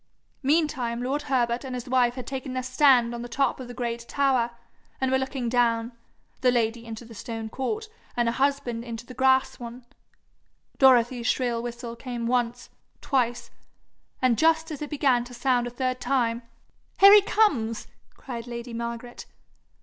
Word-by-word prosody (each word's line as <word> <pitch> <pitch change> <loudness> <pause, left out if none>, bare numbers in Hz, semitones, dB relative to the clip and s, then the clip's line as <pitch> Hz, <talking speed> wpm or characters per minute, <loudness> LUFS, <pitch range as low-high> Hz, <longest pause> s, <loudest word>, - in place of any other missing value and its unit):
Meantime 265 -5 0
lord 275 +4 -1
Herbert 240 -2 +1
and 260 -2 -5
his 250 +1 -6
wife 245 -1 +2
had 255 - -6
taken 265 -1 -5
their 255 0 -2
stand 255 -2 +4
on 235 - -5
the 240 - -7
top 275 +3 0
of 255 - -7
the 245 - -8
great 235 -1 -4
tower, 265 -4 +2 0.5
and 265 -1 0
were 265 - +3
looking 265 -2 -3
down 230 -1 +1 0.5
the 255 - +3
lady 230 -1 0
into 225 +1 -7
the 230 - -12
stone 225 0 -6
court, 425 - -3 0.3
and 240 -1 +2
her 230 - +1
husband 270 -3 0
into 235 -1 -7
the 255 - -10
grass 260 0 +2
one. 240 +1 -9 0.9
Dorothy's 245 -2 +4
shrill 240 -3 0
whistle 235 0 -6
came 240 -1 -5
once, 245 0 -1 0.3
twice 245 -3 -1 0.7
and 245 -3 +3
just 320 0 +3
as 300 - -6
it 295 - -4
began 270 -5 +2
to 245 0 -11
sound 245 0 +1
a - - -3
third 255 +1 -2
time, 245 -3 0 0.6
'Here 395 +1 +10
he 415 - +9
comes!' 280 - +1 0.3
cried 240 -2 -7
lady 235 0 -6
Margaret. 235 +1 -6
245 Hz, 170 wpm, -26 LUFS, 235-265 Hz, 0.9 s, Here